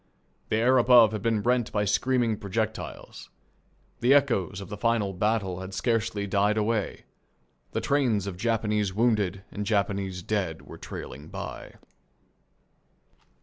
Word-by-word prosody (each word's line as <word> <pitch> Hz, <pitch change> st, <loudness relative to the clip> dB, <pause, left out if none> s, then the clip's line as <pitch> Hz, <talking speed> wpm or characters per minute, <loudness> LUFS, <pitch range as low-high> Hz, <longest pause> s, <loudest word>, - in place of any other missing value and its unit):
The -, -, +1 dB
air 125 Hz, +3 st, +4 dB
above 120 Hz, -3 st, +7 dB
had 110 Hz, -2 st, -4 dB
been 110 Hz, -1 st, 0 dB
rent 125 Hz, -2 st, +1 dB
by 105 Hz, -1 st, 0 dB
screaming 120 Hz, +1 st, +1 dB
projectiles. 110 Hz, +2 st, -4 dB, 0.7 s
The 125 Hz, +4 st, +5 dB
echoes 100 Hz, -, +1 dB
of 100 Hz, -, -9 dB
the 105 Hz, -, -5 dB
final 110 Hz, -2 st, 0 dB
battle 100 Hz, -2 st, 0 dB
had 95 Hz, 0 st, -7 dB
scarcely 115 Hz, -3 st, 0 dB
died 100 Hz, +2 st, +1 dB
away. 110 Hz, -1 st, -1 dB, 0.7 s
The -, -, -1 dB
trains 125 Hz, -9 st, +1 dB
of 100 Hz, -2 st, -4 dB
Japanese 105 Hz, -2 st, 0 dB
wounded 105 Hz, -4 st, +1 dB
and 105 Hz, -, -4 dB
Japanese 100 Hz, -3 st, -1 dB
dead 95 Hz, -6 st, -2 dB
were -, -, -12 dB
trailing 75 Hz, +4 st, -8 dB
by. -, -, -7 dB
105 Hz, 135 wpm, -27 LUFS, 100-115 Hz, 0.7 s, above